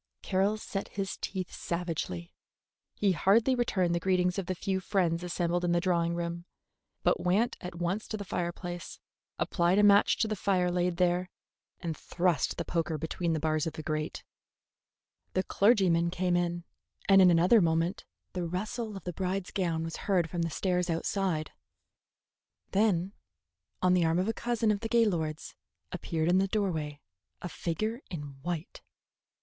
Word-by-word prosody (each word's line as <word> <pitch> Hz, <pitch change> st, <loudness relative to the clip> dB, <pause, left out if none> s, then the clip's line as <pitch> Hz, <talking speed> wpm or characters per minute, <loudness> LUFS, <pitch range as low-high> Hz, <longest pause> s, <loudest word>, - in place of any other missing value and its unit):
Carroll 195 Hz, +3 st, +1 dB
set 200 Hz, -2 st, -4 dB
his 195 Hz, -1 st, -4 dB
teeth 185 Hz, -2 st, -4 dB
savagely. 165 Hz, -, -4 dB, 0.6 s
He 200 Hz, -2 st, +2 dB
hardly 215 Hz, +8 st, +4 dB
returned 190 Hz, -8 st, +1 dB
the 170 Hz, -, +1 dB
greetings 180 Hz, +1 st, +1 dB
of 185 Hz, -, -4 dB
the 185 Hz, -, -1 dB
few 190 Hz, +2 st, -1 dB
friends 175 Hz, -3 st, 0 dB
assembled 175 Hz, 0 st, -1 dB
in 175 Hz, -1 st, +2 dB
the 175 Hz, -, +3 dB
drawing 170 Hz, -2 st, +1 dB
room, 170 Hz, 0 st, -4 dB, 0.6 s
but -, -, +3 dB
went 195 Hz, +7 st, +2 dB
at 180 Hz, -1 st, -6 dB
once 175 Hz, +5 st, -2 dB
to 215 Hz, -, -4 dB
the 200 Hz, -, -6 dB
fireplace, 175 Hz, 0 st, -4 dB, 0.4 s
applied 175 Hz, +1 st, +2 dB
a 210 Hz, -, +5 dB
match 205 Hz, 0 st, +6 dB
to 220 Hz, -, +1 dB
the 215 Hz, -, -1 dB
fire 185 Hz, -3 st, +1 dB
laid 175 Hz, -1 st, 0 dB
there, 180 Hz, 0 st, +1 dB, 0.5 s
and 165 Hz, -4 st, -3 dB
thrust 175 Hz, -1 st, 0 dB
the -, -, -3 dB
poker 165 Hz, -2 st, -1 dB
between 165 Hz, +2 st, -2 dB
the 160 Hz, -, 0 dB
bars 155 Hz, 0 st, 0 dB
of 160 Hz, -, -3 dB
the 155 Hz, -, -7 dB
grate. 155 Hz, +1 st, -3 dB, 1.1 s
The 185 Hz, -, +2 dB
clergyman 190 Hz, -6 st, +3 dB
came 180 Hz, 0 st, 0 dB
in, 175 Hz, 0 st, 0 dB, 0.4 s
and 195 Hz, -1 st, +7 dB
in 185 Hz, -, +8 dB
another 180 Hz, +6 st, +5 dB
moment 165 Hz, +2 st, +1 dB, 0.3 s
the 180 Hz, -2 st, -2 dB
rustle 210 Hz, +4 st, -3 dB
of 195 Hz, -, -10 dB
the 180 Hz, -, -4 dB
bride's 190 Hz, +1 st, -2 dB
gown 170 Hz, -4 st, -1 dB
was 165 Hz, 0 st, -5 dB
heard 180 Hz, -5 st, 0 dB
from 175 Hz, -, -2 dB
the 165 Hz, -, 0 dB
stairs 180 Hz, +2 st, 0 dB
outside. 165 Hz, -1 st, -1 dB, 1.2 s
Then, 195 Hz, -2 st, +2 dB, 0.7 s
on 180 Hz, 0 st, +5 dB
the 180 Hz, -1 st, +4 dB
arm 165 Hz, +1 st, +2 dB
of 185 Hz, +2 st, +1 dB
a 225 Hz, -, +1 dB
cousin 235 Hz, -2 st, 0 dB
of 205 Hz, -, 0 dB
the 225 Hz, -, -4 dB
Gaylords, 175 Hz, -10 st, +1 dB, 0.4 s
appeared 160 Hz, -1 st, -2 dB
in 180 Hz, +2 st, +4 dB
the 195 Hz, -, +2 dB
doorway 160 Hz, -8 st, -2 dB, 0.4 s
a -, -, -5 dB
figure 215 Hz, -, -3 dB
in 145 Hz, -6 st, -7 dB
white. 170 Hz, +1 st, -4 dB
180 Hz, 165 wpm, -30 LUFS, 170-195 Hz, 1.2 s, in